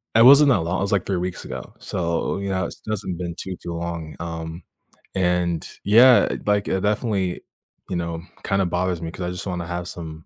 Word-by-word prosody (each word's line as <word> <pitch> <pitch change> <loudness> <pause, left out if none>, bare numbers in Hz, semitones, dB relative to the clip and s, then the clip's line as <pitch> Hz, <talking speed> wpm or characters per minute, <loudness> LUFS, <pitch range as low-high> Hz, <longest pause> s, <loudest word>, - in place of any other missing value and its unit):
It 115 +1 +8
wasn't 140 +2 +9
that 120 - +4
long 85 +3 -1
it - - -2
was, 100 - -1
like, 100 -3 +2
3 95 - 0
weeks 90 0 -4
ago, - - -7
so, 85 0 -1
you 100 0 -3
know, 95 -1 0
it - - -1
has - - -6
doesn't 105 -4 -3
been 85 -1 -4
too, 95 0 -5
too 85 - -4
long, 85 -2 -5
um, 80 0 -5 0.5
and 90 -3 +1 0.2
Yeah, 120 +5 +6
like, 105 -1 +2
it 95 - 0
definitely, 105 -3 0 0.5
you - - -2
know, 85 -1 -3 0.2
kinda 100 -1 +1
bothers 90 0 -1
me 85 - -4
'cause 95 - -9
I 90 - -2
just 90 +2 -6
wanna 90 -2 -3
have 90 0 -4
some 80 -2 -8
90 Hz, 215 wpm, -23 LUFS, 85-100 Hz, 0.5 s, wasn't